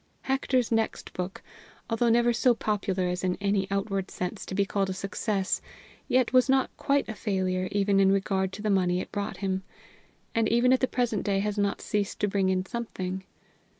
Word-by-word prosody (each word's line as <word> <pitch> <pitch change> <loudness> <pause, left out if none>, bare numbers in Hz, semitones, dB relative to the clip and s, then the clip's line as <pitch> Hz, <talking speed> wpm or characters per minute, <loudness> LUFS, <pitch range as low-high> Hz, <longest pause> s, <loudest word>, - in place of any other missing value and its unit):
Hector's 265 -3 +1
next 225 -1 -1
book, 180 +1 -5 0.4
although 235 +1 +1
never 240 +1 +4
so 240 +1 +3
popular 200 -4 -1
as 180 0 -2
in 180 -1 0
any 200 -1 +1
outward 195 -1 -1
sense 180 +3 -5
to 190 - -4
be 200 0 +2
called 195 -1 -1
a - - -1
success, 195 0 -1 0.5
yet 255 -2 +2
was 255 +1 +5
not 265 0 +2
quite 280 0 +1
a 220 - -4
failure 185 -3 -1
even 200 -1 +2
in 195 0 +5
regard 190 -1 +1
to 205 - -7
the 215 - +1
money 180 -2 +2
it - - -6
brought 200 0 -3
him, 190 -1 -1 0.7
and 225 -1 +2
even 240 +3 +4
at 260 - +3
the 260 - +2
present 240 -6 0
day 200 -1 +1
has 205 +1 -1
not 200 0 0
ceased 205 -2 -2
to 205 - +3
bring 195 -1 +1
in 185 0 +1
something. 190 -4 -4
200 Hz, 195 wpm, -28 LUFS, 190-230 Hz, 0.7 s, was